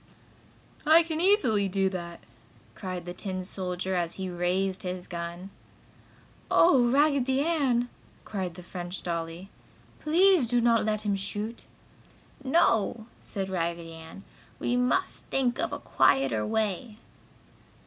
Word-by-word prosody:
"I 320 +2 +6
can 320 -1 -3
easily 250 - +3
do 195 0 +1
that!" 170 -2 -6 0.5
cried 185 -2 -6
the 175 - -5
tin 185 -1 -5
soldier, 185 0 -3
as 175 -2 -1
he 190 -1 -4
raised 185 +2 -1
his 180 -1 -5
gun. 170 +2 -6 1.0
"Oh, 260 -8 +5
Raggedy 275 -1 +3
Ann!" 275 -7 +1 0.4
cried 185 -5 -4
the 180 - -10
French 175 0 -6
dolly. 170 +2 -4 0.5
"Please 340 -2 +4
do 245 +1 +2
not 230 -2 +3
let 215 -1 -1
him 205 -2 +1
shoot!" 205 +4 -4 0.8
"No!" 230 - +2 0.2
said 195 -2 -3
Raggedy 170 -2 -3
Ann. 165 +4 -11 0.3
"We 245 - -1
must 250 +10 0
think 255 -3 0
of - - 0
a - - -3
quieter 130 -5 +2
way!" 215 - -2
195 Hz, 130 wpm, -28 LUFS, 180-245 Hz, 1.0 s, I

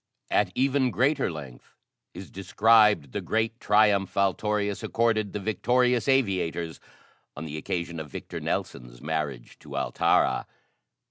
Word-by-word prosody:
At 100 -3 +2
even 130 0 +2
greater 135 +2 +1
length 70 -6 -11 0.4
is 95 +1 -9
described 105 - +3
the - - -3
great 110 +1 -1
triumph 105 -3 +2
Altorius 100 +1 0
accorded 110 -3 0
the 105 - -4
victorious 125 +4 +1
aviators 95 -10 0 0.6
on 75 - -6
the 75 -1 -6
occasion 85 +1 -4
of 75 -1 -7
Victor - - -7
Nelson's - - -4
marriage 75 -4 -4
to - - -8
Altara. - - +1
100 Hz, 125 wpm, -26 LUFS, 80-115 Hz, 0.6 s, described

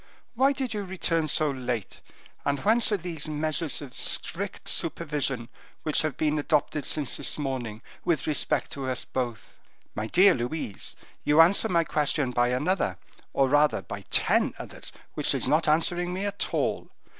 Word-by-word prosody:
Why 265 +3 +4
did 265 -4 -3
you 205 -1 -3
return 170 -4 -1
so 155 0 +3
late, 125 -5 -4 0.4
and 140 0 0
whence 225 +2 +3
are 205 - +2
these 165 -4 -4
measures 155 0 -1
of 130 -3 -10
strict 195 +2 -1
supervision 150 -7 -1 0.4
which 155 - +2
have 155 -3 -2
been 150 -1 +1
adopted 150 0 0
since 145 -4 +1
this - - +1
morning, 125 -6 -4 0.2
with 170 -3 0
respect 150 - 0
to 135 -2 -4
us 125 - -2
both?" 120 -4 -5 0.3
"My 110 +1 -3
dear 185 - +6
Louise, 120 -4 -3 0.3
you 150 +2 +3
answer 195 +7 +6
my 170 -2 +3
question 150 -4 0
by 120 0 +2
another, 130 - 0 0.3
or 135 - +2
rather, 145 +2 +3
by 100 -2 -7
ten - - +3
others, - - -7 0.2
which - - +2
is - - +2
not 155 +2 +2
answering 175 +3 +2
me 195 +2 -2
at 200 0 -2
all. - - -1
150 Hz, 165 wpm, -27 LUFS, 130-175 Hz, 0.4 s, dear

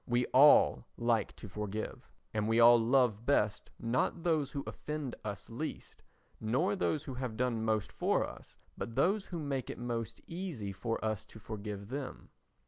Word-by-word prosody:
We 120 0 +2
all 145 +3 +7
like 115 -3 +1
to - - -9
forgive, 105 +2 -5 0.2
and 105 -1 0
we 115 +1 +3
all 120 0 +9
love 115 -2 +3
best 110 -5 +1
not 130 +8 0
those 155 -5 +2
who 140 -1 -4
offend 150 -4 -4
us 105 -1 -5
least, 140 +7 -6 0.4
nor 130 - +1
those 155 -6 0
who 135 - -6
have 125 -3 -4
done 120 -3 0
most 110 -2 0
for - - +1
us, - - -12 0.2
but 115 - -5
those 190 - +2
who 175 - -5
make 140 -4 -3
it - - -5
most 120 -2 -3
easy 165 - -5
for 115 +4 -2
us 110 -1 -1
to 110 - -13
forgive 105 -1 -6
them. 135 0 -6
120 Hz, 170 wpm, -33 LUFS, 110-140 Hz, 0.4 s, all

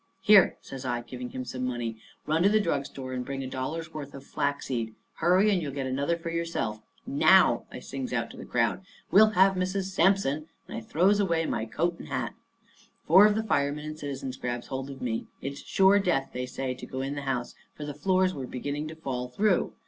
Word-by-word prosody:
"Here," 205 -2 +6
says 135 -1 -8
I, 120 -2 -1
giving 125 +1 -7
him 130 0 -5
some 130 0 -5
money, 120 -3 -2 0.3
"run 155 +2 +1
to 195 - +5
the 215 +1 +4
drug 145 -8 0
store 130 -1 -7
and 125 -1 -2
bring 135 +1 -4
a - - -4
dollar's 155 +6 -4
worth 145 -2 -7
of 135 - -9
flaxseed. 130 -6 -2 0.2
Hurry, 185 +5 +4
and 185 -3 +2
you'll 145 -3 -3
get 135 -2 -2
another 140 +5 0
one 170 - -13
for 165 - -3
yourself. 165 -11 -2 0.2
Now," 155 -3 +5
I - - -7
sings 135 -1 -5
out 115 -2 -1
to - - -12
the - - -7
crowd, 125 +10 0 0.3
"we'll 215 +3 +7
have 190 +1 +6
Mrs. 190 +1 -1
Sampson!" 165 -5 +2 0.2
And - - -7
I - - -4
throws 185 - +3
away 170 -5 +1
my 110 - -1
coat 170 +9 -1
and - - -9
hat. - - -2 0.7
Four 190 +6 +8
of 210 - +1
the 220 - 0
firemen 145 -6 0
and 155 0 -6
citizens 135 -3 -5
grabs 120 -2 -3
hold 135 +1 -4
of 135 -2 -8
me. 115 -2 -2
It's 140 +1 -5
sure 195 +1 +4
death, 170 -9 0
they 125 0 -3
say, 130 0 -3
to 130 - -9
go 130 - -4
in 135 +1 -2
the 145 - -4
house, 125 -3 -2 0.2
for 150 - -6
the 145 - -5
floors 185 +4 +2
was 130 -3 -6
beginning 145 +4 -3
to 160 - -8
fall 130 -5 -4
through. 195 +9 +1
140 Hz, 225 wpm, -28 LUFS, 130-175 Hz, 0.7 s, Four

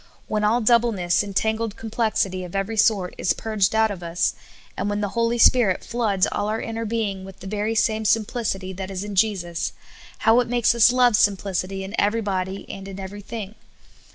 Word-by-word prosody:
When 215 -1 -1
all 225 +4 +3
doubleness 220 -6 +3
and 200 -2 -6
tangled 220 +1 0
complexit}^ 215 -4 -1
of 180 +1 -8
every 195 +3 -1
sort 205 -4 +2
is - - +2
purged 215 -1 0
out 220 -1 +3
of 190 -3 -6
us, 170 +1 0 0.4
and - - -2
when 205 0 -1
the 205 -1 -1
Holy 235 0 +1
Spirit 230 -6 +4
floods 220 -5 +1
all 205 - -1
our 220 +1 -1
inner 225 0 -4
being 210 -4 -2
with 195 0 -11
the - - -11
very 210 +3 -2
same 220 0 +1
simplicity 210 -3 0
that 190 +1 -6
is 190 0 -4
in 205 0 -6
Jesus, 185 -4 0 0.5
how 225 +1 +6
it 245 - 0
makes 240 -1 +3
us 235 0 +6
love 250 -1 +4
simplic 200 -3 +1
ity 195 +1 -6
in 190 +2 -7
everybod}^ 200 -3 -1
and 195 0 -8
in 195 0 -8
everything 205 +2 -7
205 Hz, 190 wpm, -23 LUFS, 190-225 Hz, 0.5 s, how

